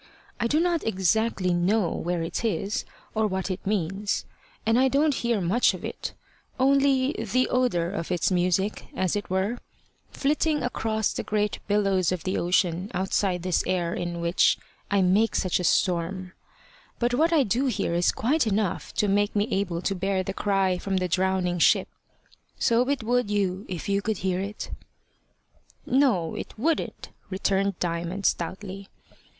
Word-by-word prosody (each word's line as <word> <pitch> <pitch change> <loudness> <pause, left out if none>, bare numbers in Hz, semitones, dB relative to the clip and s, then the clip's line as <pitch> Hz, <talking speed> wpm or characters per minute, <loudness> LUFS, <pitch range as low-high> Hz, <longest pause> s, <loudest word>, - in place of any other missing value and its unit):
I 235 - +1
do 300 +6 +2
not 340 -1 +1
exactly 190 -1 +1
know 180 +2 +2
where 175 -1 -2
it 165 +7 -3
is, 205 -1 -1 0.3
or 220 -1 +1
what 190 -1 -2
it 185 - -4
means; 200 0 -1 0.4
and 225 +2 +3
I 265 - +5
don't 290 +3 +2
hear 235 -4 0
much 190 +7 +2
of - - -8
it, - - -5 0.5
only 270 0 +3
the 230 +4 0
odour 210 -10 +1
of 185 -3 -4
its 180 +1 +1
music, 185 +3 0
as 185 0 0
it 205 - -3
were, 190 +6 0 0.5
flitting 300 +2 0
across 220 -3 -1
the - - -2
great 210 -1 -1
billows 195 -4 +2
of 180 -2 -3
the 185 0 -1
ocean 180 +1 +1
outside 185 -1 0
this 185 -2 +1
air 175 -2 0
in 175 -1 -3
which 170 +1 +3 0.3
I 200 -1 +3
make 200 +5 +3
such 185 -2 +1
a - - -2
storm; 180 +1 0 0.6
but 240 0 0
what 320 +7 +3
I 315 -4 +4
do 255 +5 +1
hear 205 -7 -1
is 175 +1 +3
quite 270 +2 +1
enough 205 -3 -1
to 210 - +2
make 205 +1 +1
me 205 +1 +2
able 180 -3 -1
to 195 - 0
bear 190 0 -1
the 195 - -4
cry 195 -3 +1
from 195 0 -1
the 185 -1 0
drowning 185 0 0
ship. - - +4 0.7
So 240 +3 +2
it 280 -5 0
would 245 -1 +1
you 195 -1 -1
if 180 -3 -5
you 200 0 +1
could 220 0 -1
hear 185 0 -1
it." 200 +2 -5 1.1
"No, 245 - +2
it - - -7
wouldn't," 310 +8 -1 0.2
returned 195 0 0
Diamond, 175 +3 -3
stoutly. 190 +3 -2
195 Hz, 165 wpm, -26 LUFS, 180-225 Hz, 1.1 s, I